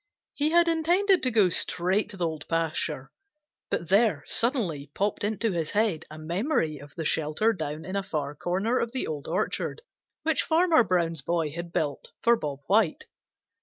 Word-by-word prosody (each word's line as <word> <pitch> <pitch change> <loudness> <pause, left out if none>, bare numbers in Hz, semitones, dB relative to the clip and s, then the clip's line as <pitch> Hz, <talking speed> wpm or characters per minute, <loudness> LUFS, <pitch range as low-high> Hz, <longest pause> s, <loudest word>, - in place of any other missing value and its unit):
He 295 +1 +1
had 340 +1 +4
intended 350 +4 +3
to 255 - +2
go 215 -6 +4
straight 185 +4 0
to 200 - -10
the 175 - 0
Old 160 -2 -4
Pasture, 160 -4 -2 0.6
but 170 - -2
there 195 -7 +3
suddenly 190 - 0
popped 205 +1 -1
into 215 +1 0
his 165 -4 -2
head 205 -7 +1
a 155 - -9
memory 165 - -1
of 145 +1 -13
the 160 - -4
shelter 160 +10 +1
down 155 -4 -5
in 185 - -5
a 200 - +1
far 150 -6 -3
corner 190 - 0
of 235 +1 -2
the 260 - -1
Old 150 -2 -5
Orchard 210 - -2 0.4
which 320 0 +2
Farmer 325 -4 +4
Brown's 170 -6 0
boy 165 +1 -1
had 170 +2 -6
built 145 -4 -2
for 235 0 +4
Bob 145 -8 -5
White. 200 -1 +2
180 Hz, 175 wpm, -27 LUFS, 155-230 Hz, 0.6 s, had